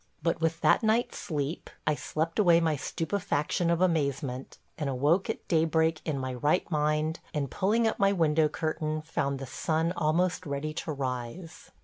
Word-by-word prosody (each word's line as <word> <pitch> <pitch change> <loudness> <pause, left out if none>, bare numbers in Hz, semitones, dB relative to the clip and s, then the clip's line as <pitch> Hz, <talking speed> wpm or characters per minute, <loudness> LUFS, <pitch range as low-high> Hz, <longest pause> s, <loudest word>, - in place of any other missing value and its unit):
But 165 -1 0
with 165 0 0
that - - +4
night's 225 +2 +1
sleep 150 -4 -3 0.2
I 150 - +3
slept 160 - -2
away 175 -5 +6
my 160 -2 +1
stupefaction 170 +2 -1
of 170 +1 +1
amazement, 140 -6 0 0.2
and 145 -3 -2
awoke 145 +8 +2
at - - -4
daybreak 160 -1 +2
in 150 -3 -1
my 130 -1 -3
right 145 +8 +1
mind, 150 +1 +1 0.2
and, 140 -4 -1
pulling 220 +4 +2
up 220 - -1
my 195 0 +4
window 160 -4 +3
curtain, 155 0 -2
found 140 -3 -1
the 135 - -6
sun 160 +6 0
almost 170 +2 +1
ready 140 +2 -3
to 160 - -4
rise. 135 +4 -5
155 Hz, 165 wpm, -29 LUFS, 145-170 Hz, 0.2 s, away